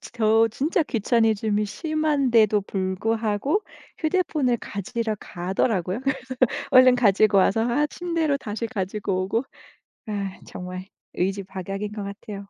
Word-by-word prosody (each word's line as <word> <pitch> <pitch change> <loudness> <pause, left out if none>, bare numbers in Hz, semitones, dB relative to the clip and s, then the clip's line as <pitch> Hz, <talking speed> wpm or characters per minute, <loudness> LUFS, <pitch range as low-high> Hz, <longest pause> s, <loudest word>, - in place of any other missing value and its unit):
저 225 -1 +2
진짜 300 - +1
귀차니즘이 220 -4 +1
심한데도 270 - +2
불구하고 215 - -1 0.4
휴대폰을 310 -7 +1
가지러 215 +3 -3
가더라고요. 185 +2 -1
그래서 270 0 -1 0.5
얼른 255 -1 +7
가지고 210 -3 +4
와서 225 +4 +3
아 295 +5 +2
침대로 330 -3 -1
다시 220 -2 -4
가지고 195 -3 -2
오고 225 +5 0 0.7
아 200 -3 -4
정말 185 0 -7 0.3
의지박약인 195 +1 -3
것 210 - -5
같아요. 200 +1 -7
220 Hz, 295 characters per minute, -24 LUFS, 195-255 Hz, 0.7 s, 얼른